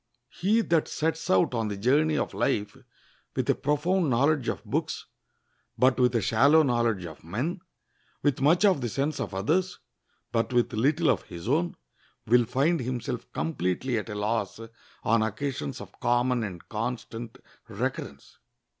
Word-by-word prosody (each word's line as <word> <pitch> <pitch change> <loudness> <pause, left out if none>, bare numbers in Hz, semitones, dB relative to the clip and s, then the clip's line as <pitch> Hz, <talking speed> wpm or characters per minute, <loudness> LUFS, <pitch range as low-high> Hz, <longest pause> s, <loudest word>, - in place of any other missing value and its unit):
He 215 +5 +2
that 165 -7 +1
sets 160 +1 -2
out 95 +6 +3
on 115 -2 0
the 100 -1 -4
journey 150 +8 +2
of - - -2
life 105 -6 0 0.6
with - - -1
a - - +3
profound 155 +4 +1
knowledge 135 +2 +2
of - - -4
books, - - -2 0.7
but 130 0 +3
with 125 -1 +3
a 115 - +3
shallow 140 +10 +5
knowledge 120 -8 +1
of 80 -2 -10
men, 130 - -3 0.6
with 145 -3 +1
much 165 +8 +4
of 185 -9 +4
the 120 - -1
sense 140 +6 -1
of 95 - -4
others, 175 - 0 0.5
but 115 +2 0
with 120 0 +2
little 145 +9 +2
of - - 0
his 85 +2 -8
own, 165 +6 +1 0.5
will 120 +1 +4
find 145 +9 +1
himself 125 -1 -4
completely 90 - -1
at 105 - -7
a 105 - -4
loss 105 0 -1 0.4
on 115 +1 +3
occasions 110 - -3
of - - -12
common 120 0 +2
and 90 -5 -7
constant 115 +1 -5 0.3
recurrence. 115 - -5
125 Hz, 155 wpm, -27 LUFS, 110-150 Hz, 0.7 s, shallow